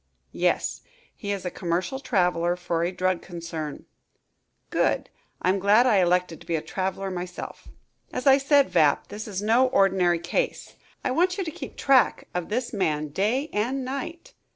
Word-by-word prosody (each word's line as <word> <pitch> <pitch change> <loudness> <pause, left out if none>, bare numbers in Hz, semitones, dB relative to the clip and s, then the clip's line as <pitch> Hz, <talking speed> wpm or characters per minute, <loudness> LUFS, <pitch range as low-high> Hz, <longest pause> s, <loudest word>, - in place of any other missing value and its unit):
"Yes. - - 0 0.3
He 205 - -4
is 195 -2 -3
a 180 - -2
commercial 180 +9 -2
traveler 180 -8 +1
for 170 -2 -2
a 175 - 0
drug 185 -1 0
concern." 165 -4 -6 0.9
"Good! - - +1 0.3
I'm 190 +2 +2
glad 205 +5 +5
I 230 -5 +4
elected 180 -2 +1
to - - -15
be 170 - 0
a 155 - -1
traveler 190 0 -3
myself." 180 0 -7 0.4
"As 255 - -4
I 270 0 +7
said, 280 0 +3
Vapp, 145 -2 +3
this 210 +2 -6
is 200 -1 -4
no 235 +5 +4
ordinary 190 -6 +3
case. 330 - -2 0.3
I - - 0
want 360 +7 +2
you 390 - -1
to 325 - -4
keep 350 - -9
track 265 -5 +3
of 180 -1 -3
this 235 +3 -2
man 155 -5 0
day 225 - 0
and 250 +6 -1
night." 275 +6 -6
195 Hz, 170 wpm, -25 LUFS, 175-255 Hz, 0.9 s, I